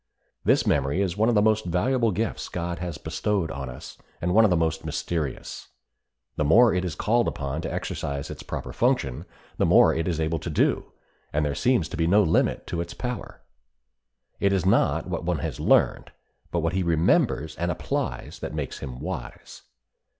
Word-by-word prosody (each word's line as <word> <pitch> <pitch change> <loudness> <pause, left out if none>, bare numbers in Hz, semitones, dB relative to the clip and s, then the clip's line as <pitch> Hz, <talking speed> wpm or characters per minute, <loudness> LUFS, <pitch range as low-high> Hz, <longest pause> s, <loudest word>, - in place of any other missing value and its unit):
This - - +3
memory 70 +4 +1
is 95 -3 0
one 110 +3 +2
of 120 - +2
the 105 - +4
most 110 0 +3
valuable 115 +8 +1
gifts 110 +2 -2
God 85 -1 -4
has 85 -3 -4
bestowed 80 +3 -1
upon 70 -3 -5
us, 60 - -10 0.2
and 90 +1 -1
one 110 +3 +6
of 110 - +5
the 90 - +3
most 80 0 0
mysterious. 80 -1 -4 0.7
The - - +1
more 110 +10 +6
it 90 0 0
is 85 -5 -3
called 115 +8 +2
upon 70 +2 -3
to - - -4
exercise 70 -1 -4
its - - -8
proper - - -6
function 70 +5 0 0.3
the - - +4
more - - +6
it 80 +1 -1
is 85 -3 -1
able 80 +1 0
to 80 - -5
do, 75 - +1 0.4
and 75 +1 0
there 70 - 0
seems 120 - +2
to 90 - -6
be 80 0 +1
no 105 +4 +5
limit 80 - +1
to 85 - -3
its 85 0 -6
power. 125 -4 -5 1.0
It 100 - +2
is 95 -2 +1
not 95 - +3
what - - -4
one 90 -1 0
has 70 - -4
learned, - - +2 0.4
but 85 - -1
what 85 +2 0
he 95 - +1
remembers 80 -2 +2
and 85 +1 -1
applies 85 - -3
that - - -5
makes - - -4
him 65 -2 -7
wise. 90 +2 -7
85 Hz, 195 wpm, -25 LUFS, 80-100 Hz, 1.0 s, one